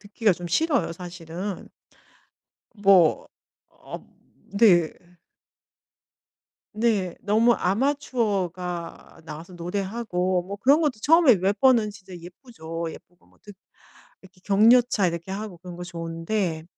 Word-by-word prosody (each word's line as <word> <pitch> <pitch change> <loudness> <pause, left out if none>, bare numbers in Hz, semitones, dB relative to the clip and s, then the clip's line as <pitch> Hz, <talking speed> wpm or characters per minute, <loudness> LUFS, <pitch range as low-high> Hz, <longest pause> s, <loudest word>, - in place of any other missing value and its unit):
듣기가 205 0 0
좀 175 0 -7
싫어요, 280 - 0
사실은. 175 +2 -7 1.1
뭐 195 -6 +4 0.6
어 - - -6 0.6
네. 175 -8 +5 1.8
네. 210 -5 -1
너무 225 +3 +3
아마추어가 195 - -2
나와서 165 +3 -10
노래하고 185 0 -2
뭐 200 +1 -6
그런 275 +10 +3
것도 265 -9 -1
처음에 310 - +5
몇 195 +3 -1
번은 240 -5 +4
진짜 195 -2 -13
예쁘죠. 170 -2 -8
예쁘고 175 +2 -16
뭐 - - -28
듣 205 - -13 0.7
이렇게 190 0 -19
격려차 220 +1 +4
이렇게 170 +2 -4
하고 200 -3 -6
그런 180 0 -10
거 175 - -7
좋은데 165 0 -4
195 Hz, 235 characters per minute, -24 LUFS, 175-220 Hz, 1.8 s, 네